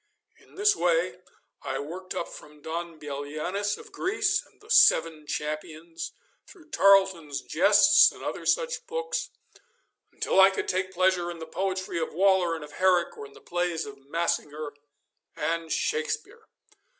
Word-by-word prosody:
In -, -, -22 dB
this 410 Hz, +1 st, +3 dB
way -, -, +1 dB, 0.4 s
I -, -, -3 dB
worked 180 Hz, +5 st, -7 dB
up -, -, -3 dB
from 150 Hz, 0 st, -13 dB
Don 165 Hz, 0 st, -5 dB
Bellianis 155 Hz, +8 st, -3 dB
of 440 Hz, -1 st, -14 dB
Greece 405 Hz, +1 st, 0 dB
and -, -, -26 dB
the 425 Hz, -, -19 dB
'Seven 160 Hz, -, +4 dB
Champions,' 155 Hz, +3 st, -5 dB, 0.4 s
through 320 Hz, -6 st, -17 dB
Tarleton's 190 Hz, -7 st, +4 dB
'Jests' -, -, +6 dB
and -, -, -13 dB
other -, -, -4 dB
such 485 Hz, -1 st, 0 dB
books, 475 Hz, 0 st, -3 dB, 0.8 s
until -, -, 0 dB
I 190 Hz, -, +8 dB
could 195 Hz, -, -4 dB
take 185 Hz, +1 st, -1 dB
pleasure 185 Hz, -1 st, +1 dB
in 170 Hz, -, -6 dB
the 160 Hz, -, -7 dB
poetry 185 Hz, +1 st, -3 dB
of 160 Hz, -, -4 dB
Waller 190 Hz, -2 st, +3 dB
and 160 Hz, -, -7 dB
of 150 Hz, -, -11 dB
Herrick, 180 Hz, 0 st, +2 dB
or 435 Hz, 0 st, -8 dB
in 425 Hz, -, -19 dB
the 435 Hz, -, -16 dB
plays 175 Hz, -2 st, -2 dB
of 210 Hz, -, -10 dB
Massinger 150 Hz, -2 st, -2 dB, 0.6 s
and 165 Hz, -1 st, -2 dB
Shakespeare. 460 Hz, 0 st, -2 dB
180 Hz, 150 wpm, -27 LUFS, -, 0.8 s, I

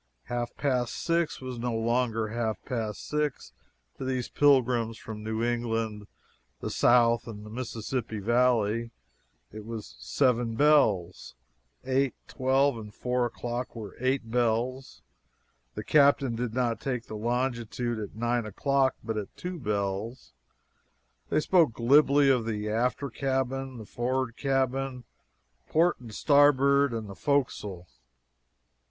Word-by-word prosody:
Half 120 Hz, 0 st, -4 dB
past 125 Hz, -4 st, 0 dB
six 170 Hz, -1 st, 0 dB
was 130 Hz, -2 st, -6 dB
no 120 Hz, -1 st, -2 dB
longer 115 Hz, -1 st, 0 dB
half 110 Hz, -2 st, -2 dB
past 110 Hz, -4 st, -4 dB
six 150 Hz, -2 st, -2 dB, 0.5 s
to -, -, -4 dB
these 130 Hz, -2 st, -2 dB
pilgrims 125 Hz, -5 st, +3 dB
from 110 Hz, -2 st, -8 dB
New 110 Hz, +1 st, -2 dB
England, 115 Hz, -3 st, -2 dB, 0.5 s
the -, -, -4 dB
South, 120 Hz, -1 st, +4 dB
and 105 Hz, -2 st, -8 dB
the 105 Hz, -, -10 dB
Mississippi 115 Hz, -1 st, -4 dB
Valley, 115 Hz, 0 st, +2 dB, 0.6 s
it 110 Hz, 0 st, -8 dB
was 110 Hz, -, -7 dB
"seven 115 Hz, -, +1 dB
bells"; 105 Hz, -, +2 dB, 0.5 s
eight, 135 Hz, 0 st, +1 dB
twelve, 130 Hz, -1 st, +1 dB
and 105 Hz, -1 st, -9 dB
four 125 Hz, -1 st, 0 dB
o'clock 120 Hz, +1 st, -5 dB
were 105 Hz, -4 st, -8 dB
"eight 130 Hz, -2 st, -1 dB
bells"; 120 Hz, +2 st, -1 dB, 0.7 s
the -, -, -4 dB
captain 140 Hz, -4 st, +4 dB
did 120 Hz, -1 st, -3 dB
not 120 Hz, -3 st, 0 dB
take 125 Hz, -4 st, -3 dB
the -, -, -9 dB
longitude 120 Hz, 0 st, -2 dB
at 105 Hz, -1 st, -7 dB
nine 120 Hz, 0 st, 0 dB
o'clock, 135 Hz, +5 st, +1 dB
but 110 Hz, -1 st, -3 dB
at 105 Hz, -2 st, -6 dB
"two 180 Hz, -1 st, -5 dB
bells." 100 Hz, -, -3 dB, 1.0 s
They -, -, +2 dB
spoke 165 Hz, -7 st, +3 dB
glibly 140 Hz, +4 st, +4 dB
of 125 Hz, -4 st, +3 dB
the 105 Hz, -1 st, -2 dB
"after 125 Hz, +4 st, -1 dB
cabin," 135 Hz, 0 st, -2 dB
the 110 Hz, -, -8 dB
"for'rard 125 Hz, +1 st, -2 dB
cabin," 135 Hz, -1 st, -1 dB, 0.7 s
"port 170 Hz, +2 st, +3 dB
and 120 Hz, -3 st, -11 dB
starboard" 140 Hz, +1 st, +4 dB
and 115 Hz, -2 st, -4 dB
the 100 Hz, -, -8 dB
"fo'castle." 105 Hz, -9 st, -1 dB
120 Hz, 130 wpm, -28 LUFS, 110-135 Hz, 1.0 s, South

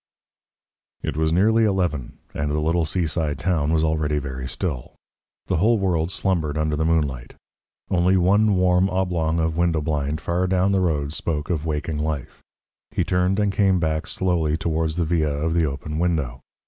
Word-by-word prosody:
It -, -, -2 dB
was 80 Hz, +1 st, +1 dB
nearly 110 Hz, +6 st, +3 dB
eleven, 90 Hz, -, -1 dB, 0.2 s
and 75 Hz, 0 st, -2 dB
the 75 Hz, +1 st, 0 dB
little 80 Hz, +2 st, +1 dB
seaside 80 Hz, -3 st, -1 dB
town 85 Hz, -3 st, 0 dB
was 80 Hz, -1 st, +2 dB
already 80 Hz, -1 st, 0 dB
very 65 Hz, -2 st, -4 dB
still. 70 Hz, -5 st, -4 dB, 0.5 s
The -, -, 0 dB
whole 110 Hz, +7 st, +3 dB
world 90 Hz, -5 st, 0 dB
slumbered 85 Hz, -6 st, -1 dB
under 75 Hz, 0 st, 0 dB
the 80 Hz, +1 st, 0 dB
moonlight. 75 Hz, -7 st, -1 dB, 0.6 s
Only 90 Hz, +1 st, +3 dB
one 100 Hz, +3 st, +3 dB
warm 90 Hz, +1 st, +3 dB
oblong 90 Hz, -4 st, 0 dB
of 80 Hz, 0 st, 0 dB
window 85 Hz, -2 st, +2 dB
blind 75 Hz, 0 st, -1 dB
far 90 Hz, +3 st, -1 dB
down 95 Hz, +1 st, +2 dB
the 95 Hz, -1 st, +2 dB
road 75 Hz, -5 st, 0 dB
spoke 75 Hz, -1 st, -3 dB
of 80 Hz, -2 st, -2 dB
waking 75 Hz, 0 st, -2 dB
life. 75 Hz, -3 st, -4 dB, 0.5 s
He -, -, -1 dB
turned 90 Hz, +2 st, +1 dB
and 100 Hz, -1 st, +1 dB
came 95 Hz, -2 st, +3 dB
back 80 Hz, -2 st, -1 dB
slowly 85 Hz, -4 st, 0 dB
towards 80 Hz, -1 st, -1 dB
the 85 Hz, -1 st, 0 dB
villa 75 Hz, -3 st, 0 dB
of 80 Hz, +2 st, -1 dB
the 85 Hz, -1 st, +2 dB
open 75 Hz, +2 st, -4 dB
window. 80 Hz, -8 st, -1 dB
80 Hz, 175 wpm, -23 LUFS, 75-90 Hz, 0.6 s, nearly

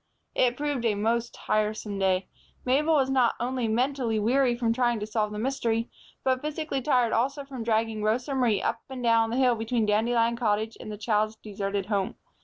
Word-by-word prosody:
It 245 Hz, -1 st, +2 dB
proved 290 Hz, -4 st, -2 dB
a 215 Hz, -3 st, +2 dB
most 230 Hz, +3 st, 0 dB
tiresome 215 Hz, -1 st, -1 dB
day. 190 Hz, -1 st, +1 dB, 0.4 s
Mabel 300 Hz, +5 st, +3 dB
was 270 Hz, -2 st, +2 dB
not 255 Hz, -3 st, +3 dB
only 250 Hz, -1 st, -1 dB
mentally 245 Hz, 0 st, 0 dB
weary 245 Hz, +3 st, +2 dB
from 230 Hz, -2 st, +1 dB
trying 240 Hz, -2 st, +1 dB
to 210 Hz, -, -3 dB
solve 215 Hz, -1 st, -1 dB
the 210 Hz, -, -5 dB
mystery, 230 Hz, -1 st, -1 dB, 0.3 s
but 260 Hz, -1 st, +1 dB
physically 300 Hz, -2 st, -3 dB
tired 250 Hz, -4 st, +2 dB
also 275 Hz, +4 st, 0 dB
from 265 Hz, -3 st, -7 dB
dragging 225 Hz, -1 st, 0 dB
Rosa 240 Hz, +6 st, 0 dB
Marie 240 Hz, -6 st, +1 dB
up 230 Hz, -, -1 dB
and 260 Hz, -2 st, -6 dB
down 230 Hz, -1 st, +3 dB
the 235 Hz, -, -2 dB
hill 255 Hz, -2 st, +4 dB
between 225 Hz, 0 st, -1 dB
Dandelion 230 Hz, +2 st, +2 dB
Cottage 220 Hz, -1 st, 0 dB
and 215 Hz, -, -7 dB
the 210 Hz, -, -6 dB
child's 215 Hz, 0 st, 0 dB
deserted 200 Hz, -2 st, -4 dB
home. 200 Hz, -2 st, -1 dB
230 Hz, 190 wpm, -27 LUFS, 215-255 Hz, 0.4 s, hill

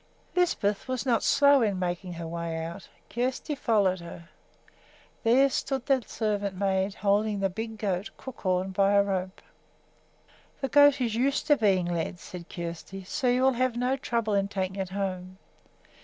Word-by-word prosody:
Lisbeth 235 Hz, -, +1 dB
was 255 Hz, 0 st, -2 dB
not 235 Hz, -4 st, +2 dB
slow 280 Hz, -1 st, +5 dB
in 205 Hz, -4 st, +1 dB
making 180 Hz, 0 st, -3 dB
her 170 Hz, 0 st, -6 dB
way 165 Hz, -1 st, -4 dB
out. 170 Hz, +4 st, -8 dB, 0.2 s
Kjersti 255 Hz, +5 st, -2 dB
followed 205 Hz, -8 st, +2 dB
her. 170 Hz, 0 st, -10 dB, 0.9 s
There 255 Hz, +4 st, +5 dB
stood 265 Hz, -1 st, -2 dB
the 270 Hz, -3 st, +2 dB
servant 205 Hz, -3 st, -2 dB
maid, 195 Hz, 0 st, 0 dB
holding 205 Hz, +1 st, +1 dB
the 195 Hz, -1 st, 0 dB
big 220 Hz, +3 st, -5 dB
goat, 200 Hz, -1 st, -2 dB
Crookhorn, 190 Hz, -7 st, -2 dB
by 195 Hz, +1 st, +3 dB
a 200 Hz, 0 st, +5 dB
rope. 190 Hz, -1 st, -3 dB, 1.2 s
"The 270 Hz, -, -2 dB
goat 285 Hz, 0 st, +6 dB
is 235 Hz, -3 st, 0 dB
used 270 Hz, +5 st, +1 dB
to 300 Hz, -1 st, +5 dB
being 195 Hz, -7 st, +2 dB
led," 175 Hz, 0 st, -2 dB
said 175 Hz, 0 st, -10 dB
Kjersti, 170 Hz, +3 st, -6 dB
"so 250 Hz, -, -2 dB
you 250 Hz, +1 st, +3 dB
will 265 Hz, 0 st, +4 dB
have 250 Hz, -1 st, 0 dB
no 250 Hz, +2 st, +1 dB
trouble 235 Hz, -5 st, -1 dB
in 200 Hz, -1 st, +2 dB
taking 190 Hz, -1 st, -3 dB
it 190 Hz, -2 st, -3 dB
home. 185 Hz, -1 st, -4 dB
200 Hz, 165 wpm, -27 LUFS, 185-250 Hz, 1.2 s, goat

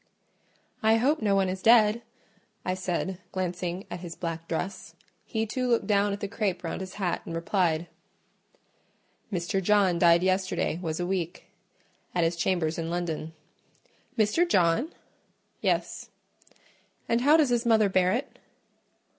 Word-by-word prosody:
"I 220 Hz, 0 st, +4 dB
hope 270 Hz, +6 st, +2 dB
no 205 Hz, -2 st, +2 dB
one 195 Hz, -1 st, +2 dB
is 185 Hz, 0 st, -4 dB
dead," 225 Hz, 0 st, +5 dB, 0.6 s
I 185 Hz, -, 0 dB
said, 185 Hz, 0 st, -3 dB
glancing 180 Hz, 0 st, -3 dB
at 175 Hz, -, -5 dB
his 170 Hz, -2 st, -8 dB
black 165 Hz, -1 st, -5 dB
dress. 180 Hz, +4 st, -4 dB, 0.3 s
He 220 Hz, -2 st, -2 dB
too 250 Hz, +4 st, -2 dB
looked 235 Hz, -1 st, +2 dB
down 205 Hz, -1 st, +2 dB
at 200 Hz, -, -4 dB
the 200 Hz, -, -2 dB
crape 195 Hz, -3 st, -2 dB
round 165 Hz, -, -4 dB
his 185 Hz, -1 st, -7 dB
hat 185 Hz, -4 st, -1 dB
and 165 Hz, -, -6 dB
replied— 165 Hz, -1 st, 0 dB, 1.5 s
"Mr. 180 Hz, +1 st, -1 dB
John 190 Hz, -3 st, +3 dB
died 170 Hz, 0 st, +5 dB
yesterday 185 Hz, -3 st, 0 dB
was 160 Hz, -2 st, -3 dB
a 175 Hz, -, -1 dB
week, 180 Hz, -2 st, -3 dB, 0.7 s
at 175 Hz, -, +2 dB
his 165 Hz, +1 st, +1 dB
chambers 170 Hz, -2 st, 0 dB
in 165 Hz, 0 st, -3 dB
London." 165 Hz, -2 st, -3 dB, 0.8 s
"Mr. 225 Hz, +12 st, +2 dB
John?" 185 Hz, -, +2 dB, 0.7 s
"Yes." -, -, -1 dB, 1.0 s
"And 230 Hz, +1 st, +1 dB
how 295 Hz, +5 st, +6 dB
does 300 Hz, -5 st, +3 dB
his 240 Hz, 0 st, +1 dB
mother 220 Hz, -2 st, +5 dB
bear 185 Hz, -1 st, +2 dB
it?" 245 Hz, +7 st, -3 dB
185 Hz, 145 wpm, -27 LUFS, 175-215 Hz, 1.5 s, how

